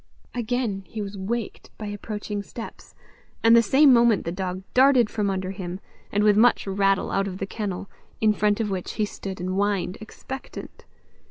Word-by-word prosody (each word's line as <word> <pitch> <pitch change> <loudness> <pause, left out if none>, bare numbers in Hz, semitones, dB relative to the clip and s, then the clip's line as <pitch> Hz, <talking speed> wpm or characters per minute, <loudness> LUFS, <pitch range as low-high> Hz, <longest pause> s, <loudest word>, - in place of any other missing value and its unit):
Again 235 -4 -1
he 220 - -7
was 200 -1 -4
waked 210 +3 -4
by 215 - -6
approaching 205 0 -4
steps, 225 +3 -10 0.5
and 230 0 +7
the 235 - +8
same 265 +5 +6
moment 235 -4 +4
the 170 - -2
dog 185 0 -4
darted 255 -3 +5
from 210 -2 0
under 190 -1 -2
him, 185 -1 -6 0.3
and 205 +1 +2
with 210 -1 +5
much 235 +3 +4
rattle 195 0 +1
out 195 0 +1
of 185 -1 -5
the 195 - -3
kennel, 195 -2 -4 0.3
in 215 -1 +4
front 210 0 +1
of 215 -3 -1
which 185 -2 -3
he 215 - 0
stood 195 -2 -7
and 180 +1 -3
whined 195 -1 0
expectant. 265 +4 -9
205 Hz, 180 wpm, -25 LUFS, 195-225 Hz, 0.5 s, the